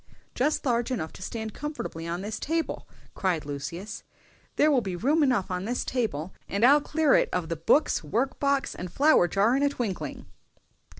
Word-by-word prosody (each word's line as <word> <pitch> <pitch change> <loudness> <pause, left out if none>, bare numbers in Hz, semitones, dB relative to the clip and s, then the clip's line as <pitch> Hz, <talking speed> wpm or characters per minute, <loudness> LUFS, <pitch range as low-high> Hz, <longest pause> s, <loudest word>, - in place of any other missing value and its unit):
"Just 290 +4 0
large 240 -2 +1
enough 200 -12 -3
to - - -12
stand 220 +2 -5
comfortably 290 - -5
on 170 +2 -3
this 210 +2 -4
side - - -12
table!" 325 +2 -2 0.3
cried 175 -6 -1
Lucius. 170 +8 -6 0.5
"There 305 +1 +4
will 265 -4 +3
be 190 -4 -4
room 285 - +2
enough 245 -9 +2
on 180 +1 -2
this 245 +3 -2
table, 195 - -2 0.2
and 200 +4 +2
I'll 285 +3 +6
clear 300 0 +2
it - - +4
of 180 -2 -2
the 165 - -1
books, 165 - +2
work 230 - -1
box, 280 -1 +1
and 180 -1 -7
flower 285 - +4
jar 200 +8 +2
in 275 - +1
a 285 - +3
twinkling." 195 - -4
220 Hz, 190 wpm, -27 LUFS, 180-280 Hz, 0.5 s, I'll